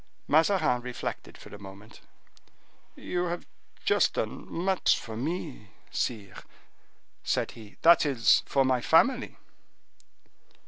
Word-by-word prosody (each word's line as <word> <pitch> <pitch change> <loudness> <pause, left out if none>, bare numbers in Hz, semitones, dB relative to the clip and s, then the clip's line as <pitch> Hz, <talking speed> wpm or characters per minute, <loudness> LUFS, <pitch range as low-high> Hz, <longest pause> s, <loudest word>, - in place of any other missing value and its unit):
Mazarin 160 -5 +3
reflected 125 0 -6
for - - -13
a 105 - -10
moment. 100 +2 -13 0.9
"You 180 0 -3
have 175 0 -4 0.4
just - - +2
done - - -4
much 185 +2 +1
for 110 - -8
me, 135 - -5 0.2
sire," 105 -5 -4 0.8
said - - -1
he, 110 -3 -14
"that 170 +1 +7
is, 125 -6 +3
for 135 -1 +2
my 130 -1 +1
family." 245 - +2
130 Hz, 110 wpm, -28 LUFS, 115-170 Hz, 0.9 s, that